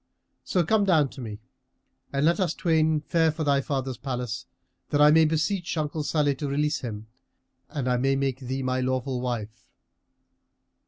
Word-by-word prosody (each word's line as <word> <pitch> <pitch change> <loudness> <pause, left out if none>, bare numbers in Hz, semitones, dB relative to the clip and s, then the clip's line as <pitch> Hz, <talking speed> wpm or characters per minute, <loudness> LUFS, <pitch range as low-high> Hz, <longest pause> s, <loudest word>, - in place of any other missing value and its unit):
So 180 - +1
come 215 +4 +3
down 160 -8 +3
to 135 - -10
me 110 -2 -7 0.7
and 140 +1 +1
let 170 +5 +3
us 180 -4 0
twain 160 -2 +2
fare 160 +1 +2
for 160 +1 -4
thy 140 -2 +2
father's 130 -2 -3
palace, 125 -3 -4 0.4
that 145 - +1
I 150 0 +7
may 160 +1 +6
beseech 165 +3 -1
uncle 155 0 -1
Salih 145 -1 +1
to 145 - -3
release 150 +2 0
him 110 -3 -6 0.6
and 140 -5 -3
I 125 -1 +2
may 135 +2 +2
make 135 -1 -1
thee 130 0 -4
my 130 0 0
lawful 130 0 -1
wife." 115 -2 -5
140 Hz, 170 wpm, -26 LUFS, 130-155 Hz, 0.7 s, I